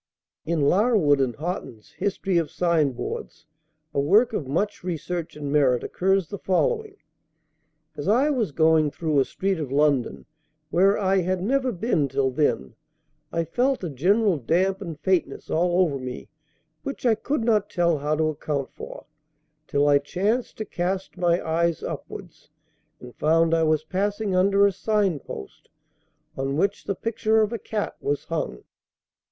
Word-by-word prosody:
In 165 -2 0
Larwood 175 - +3
and 125 -3 0
Hotten's 155 - -6
"History 195 -2 0
of 165 - -2
Sign 165 -6 +1
boards," - - -6 0.5
a - - 0
work 210 - +4
of 145 - -2
much 185 +10 -1
research 175 -1 -4
and 145 -2 -5
merit, 135 -5 +3
occurs 190 -1 +1
the 200 - -7
following: 430 - 0 1.0
"As 145 +2 -5
I 255 +9 +3
was 235 - 0
going 160 0 +3
through 155 -1 0
a 135 - +3
street 190 -2 -2
of 145 -4 -4
London 140 -3 +1 0.5
where 195 +4 +4
I 195 -1 +2
had 185 0 0
never 260 +3 +1
been 180 - 0
till 135 0 0
then, 125 - 0 0.6
I 165 - 0
felt 250 +7 0
a 170 - -3
general 190 - +2
damp 185 - +1
and 165 -6 -6
faintness 170 -4 -1
all 175 +2 +2
over 150 -7 +1
me 125 -1 -7 0.5
which 275 -1 -6
I 235 - +5
could 235 +4 -2
not 215 -3 +2
tell 170 -3 +1
how 150 +2 0
to 155 0 +1
account 145 -2 -3
for, - - -9 0.6
till 145 +1 +2
I 145 -1 +5
chanced 200 - -1
to 215 - -4
cast 185 +1 -3
my 175 -1 +1
eyes 165 0 0
upwards, - - -8 0.5
and 125 -1 -11
found 165 +1 +3
I 165 - +3
was 155 -1 +2
passing 200 +3 -1
under 195 +2 +4
a 200 - +4
sign 200 -5 0
post 65 - -10 0.7
on 135 +1 -2
which 200 +5 0
the 200 - -2
picture 220 +1 +1
of 215 +1 0
a 230 - -3
cat 210 +1 -3
was 145 0 -1
hung." 155 - -4
175 Hz, 160 wpm, -24 LUFS, 150-200 Hz, 1.0 s, I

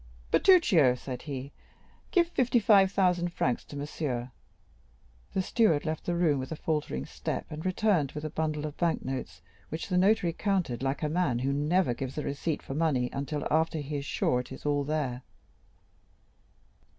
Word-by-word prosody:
"Bertuccio," 190 - +5
said 125 0 -6
he, 140 -2 -6 0.6
"give 345 -3 +3
fifty 255 -7 +2
five 200 -4 +5
thousand 180 -3 +2
francs 125 -6 0
to - - -10
monsieur." 140 -4 -3 1.0
The 190 - +1
steward 175 -10 +2
left 155 -1 -3
the 175 - 0
room 160 -5 +2
with 130 +3 -6
a - - -2
faltering 150 - -2
step, - - -4
and 155 +1 -6
returned 185 -6 +1
with 150 - -6
a 155 - -4
bundle 155 -1 -2
of 150 -1 -5
bank 170 -2 0
notes, 130 -11 -5 0.3
which 160 +4 -5
the 180 -1 +2
notary 190 -3 +3
counted 180 - -1
like 135 +3 -1
a - - +2
man 150 -6 +1
who 135 +3 0
never 150 0 +2
gives 130 +3 -6
a 150 - -1
receipt 145 +2 -2
for - - -6
money 140 -5 +1
until 140 +2 -3
after 160 +1 +2
he 145 0 -3
is 140 - -5
sure 125 - +1
it 125 - -7
is 130 - -9
all 145 -1 +1
there. 140 -4 -2
150 Hz, 175 wpm, -29 LUFS, 135-175 Hz, 1.0 s, Bertuccio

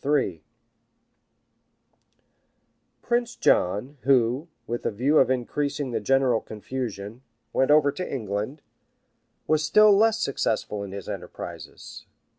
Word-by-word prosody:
81] 140 - +1 2.6
Prince 240 0 0
John, 105 +11 +1
who, 130 +3 +2 0.2
with 120 0 -4
a - - +1
view 130 +8 +2
of 130 - +4
increasing 140 +2 -2
the 115 - -1
general 130 0 +2
confusion, 110 -1 -6 0.3
went 130 - +2
over 145 -1 +5
to 180 +6 -5
England, 110 +3 -4 0.8
was 155 0 +2
still 210 +6 +6
less 225 +2 +4
successful 110 - -1
in 100 -1 -6
his 100 -1 -7
enterprises. - - -8
130 Hz, 110 wpm, -25 LUFS, 110-150 Hz, 2.6 s, still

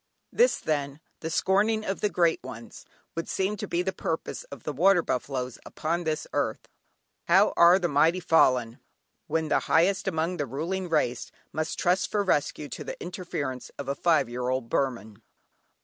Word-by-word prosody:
This - - +4
then, 145 -2 -2 0.2
"the 160 - -4
scorning 210 +6 +2
of 195 - -3
the 210 - +2
great 170 -4 +2
ones," 120 -2 -10 0.3
would 165 - -4
seem 195 +2 0
to 210 - -5
be 175 0 0
the 190 +1 -2
purpose 165 -3 -4
of 140 -5 -11
the 150 - -3
water 175 +4 +4
buffalos 125 -1 -3
upon 170 +2 -3
this 155 -1 -1
earth. - - -1 0.6
"How - - +5
are 170 +2 +7
the 180 -2 0
mighty 160 +4 +3
fallen"! 130 -9 +3 0.5
when 160 0 -1
the - - +3
highest 190 +4 +3
among 170 0 -1
the 145 -3 -2
ruling 175 +8 -3
race 130 -7 0 0.2
must 155 0 -2
trust 180 +2 +1
for 205 -1 +1
rescue 150 -4 0
to - - -6
the - - -7
interference 170 -8 -5
of 140 - -6
a 140 - 0
five 155 -2 +2
year 125 +1 -3
old 130 -2 -2
Burman. 115 -6 -2
160 Hz, 175 wpm, -27 LUFS, 135-180 Hz, 0.6 s, are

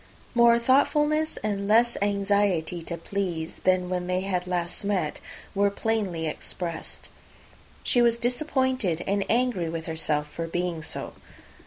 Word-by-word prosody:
More 235 -1 +6
thoughtfulness 295 +5 +2
and 200 -2 -1
less 235 +3 +4
anxiety 200 -4 +1
to 170 +1 -5
please, 170 -2 -3
than 185 -1 +3
when 180 -1 -2
they 185 +1 -1 0.2
last 175 +1 -2
met, 190 -7 -1 0.3
were 200 0 +3
plainly 200 -6 -1
expressed. 165 +2 -4 0.7
She 245 - +3
was 235 -1 +4
disappointed, 250 - 0
and 200 0 +1
angry 235 -8 +1
with 165 0 -4
herself 155 -2 -1
for 165 +2 -5
being 175 -1 -2
so. 150 - -3
195 Hz, 130 wpm, -26 LUFS, 170-235 Hz, 0.7 s, More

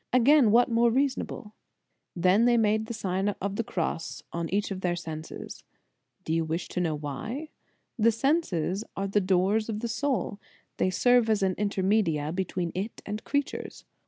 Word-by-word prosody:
Again, 255 0 +5
what 235 +3 +5
more 235 0 +3
reasonable? 250 -4 -1 0.6
They 180 +1 +3
then 240 0 +4
made 220 0 +2
the 235 - -4
Sign 195 -1 -1
of 200 +1 -3
the 230 - -1
Cross 170 -4 -3
on 170 -1 -2
each 205 +2 -1
of 190 -1 -4
their 175 -2 0
senses. 160 -2 -7 0.6
Do 160 - -1
you 165 0 +2
wish 160 +2 -3
to. 180 - -2
know 160 -3 0
why? 215 - -5 0.5
The 230 +2 +5
senses 220 - 0
are 195 0 -2
the 205 +1 +2
doors 195 +4 +2
of 215 -1 -3
the 235 - -1
soul; 230 -5 -1 0.4
they - - +2
serve 245 +4 +3
as 215 -2 +2
intermedia 190 -5 +1
between 180 -2 -2
it 200 +5 -5
and 210 +1 -5
creatures. 285 0 -3
200 Hz, 165 wpm, -28 LUFS, 180-230 Hz, 0.6 s, Again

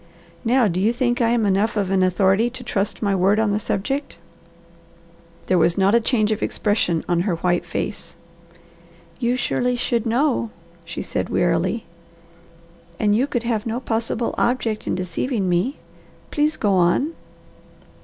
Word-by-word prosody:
Now 245 0 +3
do 180 -1 -1
you 215 +4 +3
think 245 -1 0
I 230 - +3
am 235 -2 +2
enough 205 +3 +1
of 195 -2 0
an 190 -1 +3
authority 190 +4 +3
to 255 0 -9
trust 205 -2 -2
my 200 -1 +2
word 195 +2 +3
on 220 -2 +2
the 205 - +1
subject?" 270 +5 -3 1.3
There 185 -1 +2
was 170 +2 +2
not 195 +1 +3
a 235 - +6
change 220 -2 +1
of 215 - -1
expression 205 -6 0
on 175 -1 +1
her 180 0 0
white 175 +1 0
face. 170 - -4 1.0
"You 245 0 +1
surely 250 0 0
should 240 -1 -1
know," 240 0 +1 0.4
she 165 - -5
said - - -3
wearily, 175 +6 0 1.1
"and 210 -1 +3
you 255 +5 +2
could 240 -5 -2
have 230 -2 -1
no 230 +2 -2
possible 230 -1 -2
object 235 -3 0
in - - 0
deceiving 185 +4 -2
me. 180 - 0 0.5
Please 300 +1 +1
go 205 -3 +1
on." 185 - +2
215 Hz, 160 wpm, -22 LUFS, 190-240 Hz, 1.3 s, a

